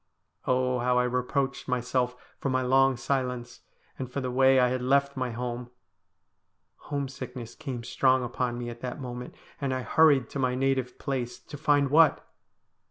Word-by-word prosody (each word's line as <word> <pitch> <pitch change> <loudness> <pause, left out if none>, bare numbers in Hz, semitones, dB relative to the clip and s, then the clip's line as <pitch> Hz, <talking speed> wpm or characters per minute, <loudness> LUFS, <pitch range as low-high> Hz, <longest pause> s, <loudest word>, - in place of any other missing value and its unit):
Oh, 125 0 +2
how 125 +1 +2
I 125 - +4
reproached 125 +2 -1
myself 125 0 0 0.2
for 140 - -1
my 130 0 +1
long 135 0 +4
silence, 125 -2 -2 0.4
and 130 -1 -5
for 140 - -2
the 130 -2 -3
way 130 +1 +5
I 125 -1 +4
had 130 0 -1
left 140 +2 +2
my 130 -1 -2
home! 120 +1 -4 1.2
Home 140 -2 -1
sickness 125 -3 -8
came 130 -6 -6
strong 130 +2 +2
upon 120 0 -2
me 120 -1 -4
at 120 0 -11
that 125 +2 -5
moment, 125 -2 -7 0.3
and 135 -2 0
I 130 - -3
hurried 145 0 +4
to 140 - -4
my 130 -1 +1
native 130 -1 0
place, 125 -3 -3
to - - -11
find 145 -2 +2
what 160 -1 +5
130 Hz, 170 wpm, -28 LUFS, 125-135 Hz, 1.2 s, way